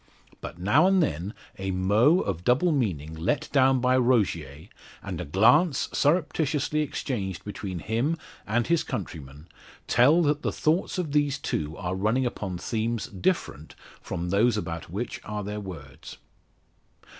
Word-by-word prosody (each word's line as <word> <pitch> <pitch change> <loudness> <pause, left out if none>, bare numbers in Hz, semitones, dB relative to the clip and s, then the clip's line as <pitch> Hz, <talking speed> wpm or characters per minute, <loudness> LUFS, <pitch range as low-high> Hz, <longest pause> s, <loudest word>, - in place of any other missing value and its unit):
But - - -7
now 110 - +4
and 190 -2 +4
then, 90 - -3 0.2
a 95 0 -3
mot 105 - +3
of 90 -4 -3
double 135 - +3
meaning 90 - -1
let 90 - -1
down 135 -1 +4
by 125 +1 +2
Rogier, 95 - 0 0.4
and - - -5
a - - -5
glance 135 - +3
surreptitiously 150 -1 +1
exchanged 105 - -3
between 100 -2 -5
him 115 - -1 0.3
and 115 +3 +1
his 170 +2 +2
countryman, 80 - -7 0.4
tell 145 +8 +4
that 150 -1 +1
the - - -1
thoughts 165 +5 0
of 170 -5 -2
these 145 -1 +1
two 80 - -3
are 90 -2 -3
running 110 +7 +1
upon 100 -6 -3
themes 115 +4 -2
different 85 -5 -2 0.3
from 90 0 -4
those 110 +3 +3
about 85 -6 -5
which 105 +8 -4
are 105 0 -4
their 105 +1 -4
words. 80 -10 -10
110 Hz, 145 wpm, -26 LUFS, 90-140 Hz, 0.4 s, now